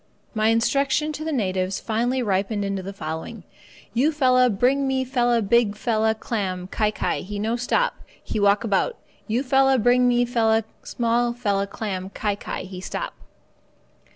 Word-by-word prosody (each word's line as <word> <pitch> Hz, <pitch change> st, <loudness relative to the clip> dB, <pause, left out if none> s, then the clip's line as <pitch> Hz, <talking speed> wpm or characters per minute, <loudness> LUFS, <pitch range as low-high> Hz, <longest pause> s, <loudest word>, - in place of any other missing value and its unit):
My 215 Hz, -1 st, +1 dB
instruction 275 Hz, +6 st, +2 dB
to 300 Hz, -, -5 dB
the 320 Hz, -, -2 dB
natives 190 Hz, -6 st, -1 dB
finally 240 Hz, +3 st, -1 dB
ripened 205 Hz, 0 st, 0 dB
into 195 Hz, -1 st, -2 dB
the 190 Hz, +1 st, -6 dB
following 165 Hz, +3 st, -6 dB, 0.5 s
"You 265 Hz, +7 st, +3 dB
fella 255 Hz, -4 st, +4 dB
bring 260 Hz, +6 st, +2 dB
me 265 Hz, -1 st, +1 dB
fella 240 Hz, -3 st, +1 dB
big 210 Hz, 0 st, +3 dB
fella 220 Hz, -1 st, +1 dB
clam—kai 200 Hz, -1 st, -2 dB
kai 215 Hz, -, -2 dB
he 205 Hz, +2 st, -6 dB
no 220 Hz, +3 st, -1 dB
stop, 250 Hz, -, +1 dB, 0.3 s
he -, -, -3 dB
walk 200 Hz, +1 st, +3 dB
about. 225 Hz, -, 0 dB, 0.3 s
You 235 Hz, +4 st, 0 dB
fella 270 Hz, 0 st, +4 dB
bring 245 Hz, +2 st, +4 dB
me 245 Hz, 0 st, +3 dB
fella 225 Hz, -2 st, +2 dB, 0.2 s
small 235 Hz, 0 st, 0 dB
fella 200 Hz, -5 st, -1 dB
clam—kai 200 Hz, 0 st, -3 dB
kai -, -, -5 dB
he 185 Hz, 0 st, -8 dB
stop." -, -, -4 dB
225 Hz, 155 wpm, -23 LUFS, 200-250 Hz, 0.5 s, fella